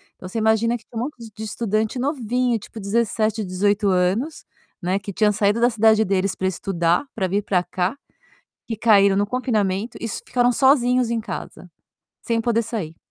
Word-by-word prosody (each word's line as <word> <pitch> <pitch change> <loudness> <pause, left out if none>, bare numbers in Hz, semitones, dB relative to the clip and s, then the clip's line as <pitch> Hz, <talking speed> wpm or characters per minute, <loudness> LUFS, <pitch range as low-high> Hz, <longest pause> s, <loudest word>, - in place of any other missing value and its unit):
Então, 185 - -10
você 225 - -5
imagina 220 +2 +2
que 225 - -23
tinha 235 - -10
um - - 0
monte 290 -2 -8 0.2
de 220 - -7
estudante 220 +2 -1
novinho 250 -3 0
tipo 220 +1 -10
17, 215 +1 0
18 200 +2 0
anos, 190 - 0 0.4
né, 185 +3 0
que 200 0 -7
tinha 210 +2 +2
saído 210 +1 +1
da 240 - +4
cidade 220 -1 +4
deles 195 0 0
para 190 - -1
estudar, 175 +2 0
para 190 -4 0
vir 200 +3 -1
para 185 -3 +1
cá, 185 +8 -2 0.7
que 225 - -4
caíram 200 -3 +4
no 205 +1 +2
confinamento 215 -4 -1
e 230 - -3
ficaram 245 +3 0
sozinhos 250 -2 +3
em 230 -1 0
casa, 225 - -8 0.5
sem 230 -1 0
poder 230 0 +1
sair. 195 -9 -5
215 Hz, 180 wpm, -22 LUFS, 195-235 Hz, 0.7 s, da